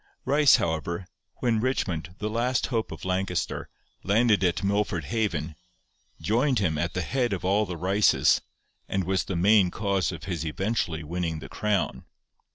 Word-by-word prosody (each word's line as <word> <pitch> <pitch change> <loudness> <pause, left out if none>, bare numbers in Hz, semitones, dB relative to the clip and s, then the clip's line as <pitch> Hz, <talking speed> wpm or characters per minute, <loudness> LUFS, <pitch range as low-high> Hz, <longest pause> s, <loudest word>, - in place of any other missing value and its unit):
Ryce, 145 +1 +6
however, 85 +2 -2 0.4
when 115 -3 +2
Richmond, 95 -9 -2
the 105 - -3
last 120 +3 0
hope 115 -1 -1
of - - -8
Lancaster, 95 -1 -2 0.3
landed 105 0 +3
at 90 +2 +1
Milford 100 -3 0
Haven, 85 -6 -2 0.7
joined 120 - +1
him 90 -7 +1
at 85 - -2
the 95 - -1
head 125 -2 0
of 90 -1 -4
'all 100 +2 +2
the 90 -1 -5
Ryces,' 95 +5 +3 0.5
and 95 0 0
was 95 +2 0
the 95 - -3
main 95 +2 +5
cause 100 -1 0
of 80 -4 -8
his 85 -5 -3
eventually 85 -1 -2
winning 85 +1 -3
the - - -9
crown. 105 -2 -1
95 Hz, 160 wpm, -26 LUFS, 85-110 Hz, 0.7 s, Ryce